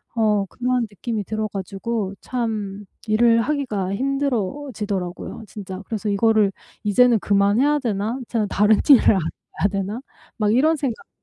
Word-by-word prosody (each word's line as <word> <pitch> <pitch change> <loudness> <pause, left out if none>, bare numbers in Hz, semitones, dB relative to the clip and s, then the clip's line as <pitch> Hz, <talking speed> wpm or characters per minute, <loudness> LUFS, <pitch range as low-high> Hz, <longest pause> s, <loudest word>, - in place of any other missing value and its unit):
어 210 -3 +2
그러한 250 +2 -1
느낌이 215 +1 -4
들어 215 +1 -2
가지고 200 +1 -4
참 210 -5 -3 0.2
일을 230 +2 +4
하기가 225 -9 -1
힘들어지더라고요 230 -7 -2
진짜. 190 -2 -7
그래서 220 -1 -3
'이거를 210 0 +3 0.3
이제는 230 +2 +4
그만해야 205 +10 +3
되나? 220 -1 -2
이제는 225 -3 -1
다른 210 +2 +3
일을 280 -5 +7
알아봐야 185 +1 -1
되나?' 200 +4 -3 0.4
막 210 -2 +2
이런 305 +7 +4
생각이 270 -6 -4
215 Hz, 330 characters per minute, -22 LUFS, 200-245 Hz, 0.4 s, 일을